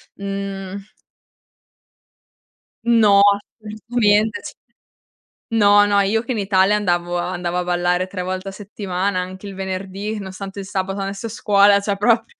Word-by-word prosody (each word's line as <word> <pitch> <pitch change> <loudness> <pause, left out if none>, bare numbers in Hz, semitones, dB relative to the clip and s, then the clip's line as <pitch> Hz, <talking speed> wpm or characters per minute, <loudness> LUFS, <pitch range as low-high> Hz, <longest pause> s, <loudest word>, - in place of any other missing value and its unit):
mhmm 195 0 -6 1.9
No 220 -4 +5 0.4
assolutamente, 215 0 0
c - - -8 1.0
no, 205 -2 +5
no, 205 0 +2
io 210 +3 +1
che 260 - -5
in - - -3
Italia 195 0 +3
andavo 175 -3 0
a 175 +1 -2
andavo 175 -1 -3
a 180 - 0
ballare 180 +1 0
3 185 -1 -5
volte 185 +1 -4
a - - -7
settimana, 195 -1 -3
anche 185 +2 -6
il 195 - -7
venerdì, 195 +2 -4
nonostante 195 0 -7
il 195 - -6
sabato 195 0 -3
andassi 195 +2 -4
a - - -7
scuola, 205 -2 +4
cioè 200 0 -1
proprio 230 +2 +2
195 Hz, 145 wpm, -20 LUFS, 185-205 Hz, 1.9 s, No